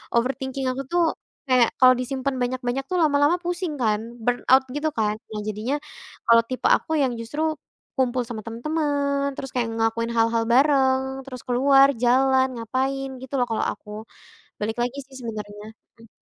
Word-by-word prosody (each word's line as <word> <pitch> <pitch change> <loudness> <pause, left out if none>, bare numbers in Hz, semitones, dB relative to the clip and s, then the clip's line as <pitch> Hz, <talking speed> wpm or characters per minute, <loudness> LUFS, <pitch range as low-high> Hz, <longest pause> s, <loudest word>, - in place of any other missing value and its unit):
overthinking 265 +2 -1
aku 260 +2 -4
tuh 350 0 +3 0.4
kayak 250 -3 +4
kalo 255 -1 +8
disimpen 265 +1 -2
banyak-banyak 245 +1 -1
tuh 365 - -1
lama-lama 290 +2 +3
pusing 350 -1 -2
kan 215 -2 +2 0.2
burn 245 +1 0
out 260 0 +7
gitu 295 +1 -1
kan. 210 -1 +1 0.2
Nah 210 -1 -4
jadinya 215 +6 -2 0.5
kalo 230 0 +6
tipe 255 - -5
aku - - -11
yang 265 -2 +2
justru 235 +7 -5 0.6
kumpul 250 -1 +1
sama 225 -2 -6
temen-temen, 280 +2 -1
terus 270 -1 -7
kayak 245 -2 0
ngelakuin 225 +1 0
hal-hal 230 0 +2
bareng, 265 -1 +4 0.3
terus 255 -2 -8
keluar 270 +2 +5 0.2
jalan 260 +2 +4
ngapain 265 +4 -2
gitu 260 +1 -11
loh - - +4
kalo 225 - -1
aku, 210 - -12 0.7
balik 220 +2 -2
lagi 245 +3 -2
sih 270 0 -17
sebenernya, 210 -2 -7 0.3
mmm. 230 -1 -17
255 Hz, 160 wpm, -24 LUFS, 230-275 Hz, 0.7 s, kalo